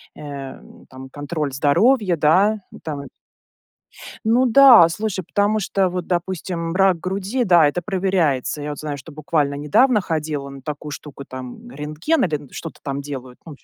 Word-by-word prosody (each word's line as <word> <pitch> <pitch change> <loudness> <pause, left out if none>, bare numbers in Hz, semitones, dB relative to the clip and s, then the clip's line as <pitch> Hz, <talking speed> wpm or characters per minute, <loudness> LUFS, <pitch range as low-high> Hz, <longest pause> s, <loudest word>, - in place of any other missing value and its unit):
э, 140 -2 -8 0.3
там 130 0 -11
контроль 145 0 -4
здоровья, 185 - +3
да. 190 +9 +3
Ну - - -12
там 145 -3 -5 1.2
ну 235 +4 +3
да, 245 -7 +8
слушай, 200 +1 -3
потому 205 +5 +1
что, 195 -1 0
вот 180 -1 -4
допустим, 175 -1 -3
рак 190 -2 +3
груди, 195 +8 -2
да, 175 -7 +5
это 160 +5 -2
проверяется. 180 -8 0
Я 145 - -4
вот 145 - -7
знаю, 150 -2 -4
что 140 +4 -12
буквально 150 -1 -1
недавно 210 - +3
ходила 155 -5 -3
на 135 0 -11
такую 150 0 -6
штуку: 145 -1 -9
там 130 - -9
рентген, 155 - -1
или 160 -5 0
н 140 - -15
что-то 165 - -8
там 140 0 -3
делают. 130 -3 -8
Ну 160 - -9
160 Hz, 165 wpm, -21 LUFS, 145-195 Hz, 1.2 s, да